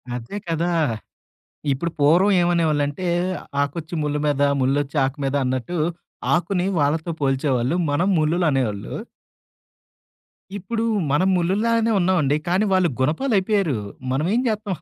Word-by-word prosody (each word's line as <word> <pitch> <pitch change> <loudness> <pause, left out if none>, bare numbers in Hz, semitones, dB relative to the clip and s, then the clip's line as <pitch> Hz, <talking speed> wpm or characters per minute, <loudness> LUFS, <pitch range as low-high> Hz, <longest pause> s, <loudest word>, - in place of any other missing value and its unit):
అదే 125 - -6
కదా! 165 +1 0 1.0
ఇప్పుడు 165 +6 -2
పూర్వం 170 +8 +4
ఏమనేవాళ్ళంటే 160 -2 +1 0.6
"ఆకొచ్చి 155 +4 -4
ముల్లు 150 0 -1
మీద 145 -1 +1 0.2
ముల్లొచ్చి 140 +3 0
ఆకు 135 +1 -4
మీద" 135 +1 -1
అన్నట్టు, 130 +7 -2 0.6
ఆకుని 175 +1 0
వాళ్ళతో 155 +4 0
పోల్చేవాళ్ళు 135 0 +1
మనం 165 +6 +1
ముల్లులనేవాళ్ళు. 150 - 0 1.6
ఇప్పుడు 225 +4 -3 0.3
మనం 150 +7 +3
ముల్లుల్లాగానే 225 +6 +1
ఉన్నామండి. 160 -6 +2
కానీ 185 +5 +2
వాళ్ళు 185 -2 +3
గునపాలయిపోయారు. 195 - +1 0.4
మనం 140 +4 0
ఏం 245 - +2
జేత్తాం. 210 -4 -2
160 Hz, 110 wpm, -22 LUFS, 140-185 Hz, 1.6 s, పూర్వం